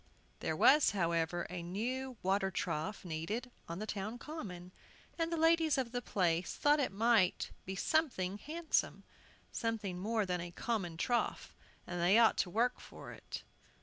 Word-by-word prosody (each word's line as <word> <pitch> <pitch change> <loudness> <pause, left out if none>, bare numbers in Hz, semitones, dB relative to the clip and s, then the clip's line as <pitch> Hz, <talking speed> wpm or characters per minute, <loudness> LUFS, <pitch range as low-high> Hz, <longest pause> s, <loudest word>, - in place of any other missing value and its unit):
There - - -1
was, 295 +2 +6
however, 170 0 +1
a 180 0 -5
new 245 +8 -3
water 190 +1 +2
trough 170 +2 -3
needed 180 +10 -3 0.2
on 170 - -4
the 215 - -4
town 215 +2 -4
common, 195 - -7 0.5
and 330 0 0
the 335 - 0
ladies 325 -2 +4
of 255 -3 -1
the 245 0 -2
place 175 -5 0
thought 295 +1 +4
it 275 - +1
ought 210 -2 +3
to - - -4 0.2
be 190 - -3
something 205 - 0
handsome, 320 +4 -1 0.5
something 215 -6 -2
more 215 +2 0
than 180 -2 -1
a 175 - -5
common 175 -3 -2
trough, 240 +7 -1 0.3
and 175 -1 -4
they 180 +5 +5
ought 230 -1 +6
to 180 - +1
work 240 +6 +1
for - - -10
it. - - -8
210 Hz, 165 wpm, -34 LUFS, 180-250 Hz, 0.5 s, was